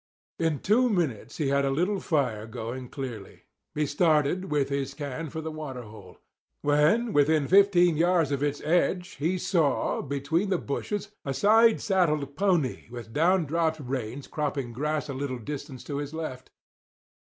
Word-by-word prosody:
In 160 -4 0
two 245 +5 +3
minutes 165 - -1
he 150 -4 0
had 140 0 +2
a 135 - +1
little 180 +9 0
fire 125 - -1
going 120 +3 -6
clearly. 120 -7 -7 0.3
He 150 0 +1
started, 155 +3 +2
with 145 -2 +1
his 140 -1 -2
can, 150 +2 -5
for 160 - -5
the 160 0 -5
water 145 -5 -6
hole. 105 -4 -13 0.5
When 155 +11 +3
within 145 0 +3
fifteen 180 -4 +5
yards 170 -3 +3
of 140 -1 -1
its 145 0 -1
edge 175 +2 0
he 175 +5 +1
saw, 165 -6 +1
between 145 +7 -1
the 190 - +2
bushes, 205 +8 -4
a 135 -1 -3
side 225 - +5
saddled 155 -8 +1
pony 175 -8 0
with 120 -2 -9
down 175 +3 +3
dropped 160 +1 0
reins 130 -1 -4
cropping 140 -5 -3
grass 150 +4 -2
a 140 - -4
little 135 -1 -3
distance 135 +1 -7
to 140 - -4
his 145 +2 -5
left. 145 -6 -6
150 Hz, 165 wpm, -27 LUFS, 135-175 Hz, 0.5 s, fifteen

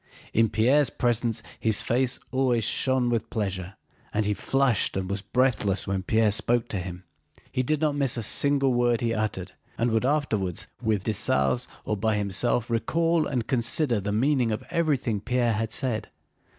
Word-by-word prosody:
In 115 0 +3
Pierre's 125 +6 +3
presence 115 -2 -1 0.2
his 110 -2 +1
face 125 +2 0
always 130 -3 +1
shone 130 0 +1
with 115 -2 -1
pleasure 95 -2 -3 0.4
and 110 0 0
he 105 - +1
flushed 135 -3 +1
and 95 -1 -2
was 100 +1 -3
breathless 115 -5 +1
when 95 -1 -2
Pierre 110 +2 +2
spoke 120 +3 +1
to 100 - -2
him. 90 0 -7 0.5
He 130 - 0
did 150 +4 -1
not 150 -2 +1
miss 135 -4 0
a 115 - -2
single 140 +3 +3
word 120 -1 +2
he 115 -1 0
uttered, 100 -4 -3 0.3
and 115 +1 +1
would 110 +1 +1
afterwards, 120 - -1 0.2
with 110 -3 0
Dessalles 105 - +2 0.2
or 105 - -1
by 110 +2 0
himself, 105 +4 0
recall 165 +7 +1
and 125 -4 -1
reconsider 125 0 +1
the 100 +1 -3
meaning 125 +2 +1
of 110 - -3
everything 140 -10 0
Pierre 120 +1 0
had 110 +1 -2
said. 125 -5 -3
115 Hz, 170 wpm, -26 LUFS, 105-130 Hz, 0.5 s, In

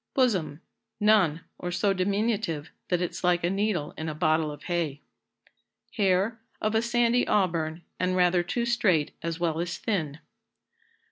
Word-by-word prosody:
Bosom. 185 - +1 0.4
None; 200 -7 +4 0.2
or 180 - -3
so 195 +3 +2
diminutive, 195 -4 -1 0.2
that 180 0 +1
it's 180 - -4
like 175 -1 +2
a 175 - +1
needle 195 -6 -1
in 160 0 -4
a 155 - -5
bottle 155 -1 +2
of 145 - -10
hay. 165 -5 -2 0.9
Hair. 200 +2 +1 0.2
Of 215 0 0
a 220 - +3
sandy 240 +1 +2
auburn, 170 -5 0 0.2
and 185 0 +1
rather 180 -1 +4
too 235 +7 -2
straight 190 -11 +2
as 165 0 -3
well 165 -2 0
as 175 0 -2
thin. 160 -10 -2
180 Hz, 150 wpm, -27 LUFS, 165-210 Hz, 0.9 s, None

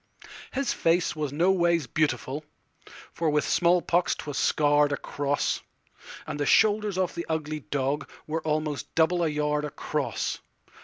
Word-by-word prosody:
His 275 0 -1
face 165 0 +1
was 150 -3 -2
no 170 +6 +3
ways 170 -4 +2
beautiful, 145 +1 -1 0.7
For 165 -2 0
with 150 0 +1
small 175 +1 +3
pox 175 +1 +2
't - - -8
was 145 -2 -5
scarr'd 145 -1 +3
across; 145 0 -1 0.6
And 145 - -5
the 145 - 0
shoulders 210 -2 +3
of 185 -2 0
the 170 - -5
ugly 155 -1 -2
dogWere 145 +3 -2
almost 155 -2 -2
double 175 +2 +3
a - - +2
yard 150 0 0
across. 150 - -3
155 Hz, 145 wpm, -27 LUFS, 150-170 Hz, 0.7 s, no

